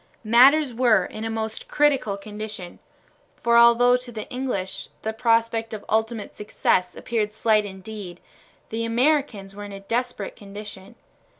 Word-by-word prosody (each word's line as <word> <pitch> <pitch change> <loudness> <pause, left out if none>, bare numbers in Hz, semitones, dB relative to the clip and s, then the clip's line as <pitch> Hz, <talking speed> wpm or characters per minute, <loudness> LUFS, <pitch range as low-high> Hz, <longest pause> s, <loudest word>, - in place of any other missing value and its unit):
Matters 260 +5 +5
were 235 -2 +3
in 215 - -7
a - - -2
most 220 0 -4
critical 275 -9 +1
condition, 210 -2 -8 0.6
for 235 0 +1
although 235 +1 +6
to 250 -1 -8
the 220 -2 -7
English 245 -8 -4
the 220 - -2
prospect 230 -1 +1
of 210 - -10
ultimate 220 0 -1
success 185 -3 0
appeared 215 -3 -2
slight 215 -1 +2
indeed, 190 -2 -8 0.5
the 225 +1 -3
Americans 230 -5 0
were 205 - -7
in 205 - -8
a 195 - -7
desperate 230 0 -3
condition. 200 -1 -10
220 Hz, 140 wpm, -24 LUFS, 205-235 Hz, 0.6 s, although